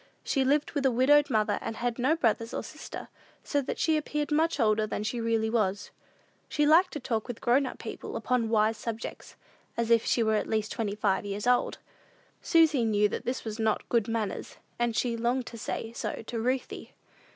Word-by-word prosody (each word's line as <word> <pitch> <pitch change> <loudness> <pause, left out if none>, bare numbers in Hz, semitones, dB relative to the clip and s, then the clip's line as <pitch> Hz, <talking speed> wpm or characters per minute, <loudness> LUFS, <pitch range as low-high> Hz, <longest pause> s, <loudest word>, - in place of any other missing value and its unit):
She 270 - +1
lived 285 +3 +2
with 285 - -2
a - - +2
widowed 285 +5 +4
mother, 215 -3 +1
and 225 - -4
had 240 +1 -2
no 265 +6 +3
brothers 230 -5 0
and - - -3
sisters, - - -8 0.4
so 285 - 0
that 260 - -4
she 320 -2 +2
appeared 300 0 -2
much 320 +2 +2
older 215 -1 +2
than 210 - -3
she 230 +3 -2
really 225 -1 +1
was. 205 -3 0 0.6
She 295 - +1
liked 340 +5 +5
to 295 - -3
talk 225 -4 -2
with 245 -2 -6
grown 255 +2 +2
people - - -7
upon 245 -3 0
wise 220 0 +2
subjects, 225 +1 -6 0.4
as 235 0 0
if 230 -1 +5
she 235 - +2
were 220 0 +2
at - - -2
least 215 -1 -1
twenty 205 -3 -2
five 205 -2 +1
years 205 +1 -4
old. 245 0 +2 0.6
Susy 320 -6 +4
knew 210 -2 +3
that - - -5
this 250 0 -3
was 220 0 -5
not 220 -1 0
good 230 -3 +2
manners, 225 -4 -3 0.2
and 240 -1 +1
she 235 0 0
longed 240 +2 0
to 230 - -9
say 225 +1 -4
so 235 - -4
to 230 +1 -4
Ruthie. 255 +3 -2
230 Hz, 200 wpm, -28 LUFS, 220-265 Hz, 0.6 s, liked